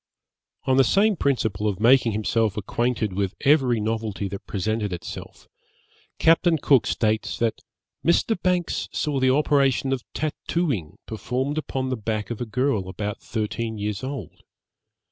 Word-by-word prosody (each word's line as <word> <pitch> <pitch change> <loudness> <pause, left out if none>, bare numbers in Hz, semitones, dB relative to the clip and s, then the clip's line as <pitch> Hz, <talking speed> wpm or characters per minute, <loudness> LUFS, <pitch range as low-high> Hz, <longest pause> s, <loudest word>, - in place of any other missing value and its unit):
On 130 +1 +2
the 135 - +7
same 205 - +3
principle 115 - 0
of 100 -3 -1
making 120 0 +5
himself 110 0 0
acquainted 115 0 -1
with 100 0 -1
every 135 -5 +4
novelty 110 -2 -2
that 100 +1 -8
presented 105 +1 -1
itself, 90 - -8 0.7
Captain 165 +1 +4
Cook 135 -6 +3
states 110 -1 0
that 115 -1 0 0.4
'Mr. 170 +6 +3
Banks 180 -2 0
saw 145 -3 -1
the 130 0 +3
operation 135 -1 +2
of 130 - -2
tattooing 150 - -2
performed 130 +6 -2
upon 130 -3 -3
the 130 - -1
back 110 0 -3
of 120 - -5
a 120 - -3
girl 110 -4 0
about 105 +2 -4
thirteen 110 0 -3
years 105 0 -3
old. 135 0 -6
120 Hz, 145 wpm, -24 LUFS, 105-140 Hz, 0.7 s, the